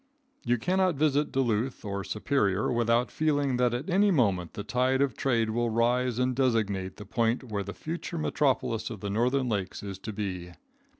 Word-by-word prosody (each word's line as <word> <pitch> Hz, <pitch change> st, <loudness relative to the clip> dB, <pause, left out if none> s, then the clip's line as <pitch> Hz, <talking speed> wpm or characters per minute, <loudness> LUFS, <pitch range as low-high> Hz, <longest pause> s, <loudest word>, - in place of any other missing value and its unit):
You 120 Hz, 0 st, +2 dB
cannot 185 Hz, +5 st, +1 dB
visit 145 Hz, 0 st, +1 dB
Duluth 120 Hz, -2 st, -1 dB
or 100 Hz, -1 st, -3 dB
Superior 105 Hz, 0 st, 0 dB
without 120 Hz, 0 st, +2 dB
feeling 145 Hz, -4 st, +1 dB
that 125 Hz, -1 st, +3 dB
at 125 Hz, +5 st, -3 dB
any 195 Hz, +3 st, +3 dB
moment 100 Hz, -, +1 dB
the 105 Hz, -, -5 dB
tide 125 Hz, +4 st, +1 dB
of 135 Hz, -5 st, +1 dB
trade 115 Hz, -4 st, +1 dB
will 120 Hz, +1 st, 0 dB
rise 120 Hz, +2 st, +1 dB
and 125 Hz, 0 st, +1 dB
designate 105 Hz, -7 st, 0 dB
the 105 Hz, -, -9 dB
point 115 Hz, +4 st, 0 dB
where 105 Hz, -5 st, -3 dB
the 100 Hz, 0 st, -6 dB
future 170 Hz, +2 st, -5 dB
metropolis 130 Hz, -7 st, 0 dB
of 110 Hz, -5 st, -8 dB
the 100 Hz, -, -3 dB
northern 125 Hz, +5 st, +1 dB
lakes 100 Hz, -5 st, -3 dB
is 100 Hz, -2 st, -6 dB
to 110 Hz, -, -6 dB
be. 90 Hz, -4 st, -5 dB
120 Hz, 180 wpm, -28 LUFS, 105-135 Hz, -, that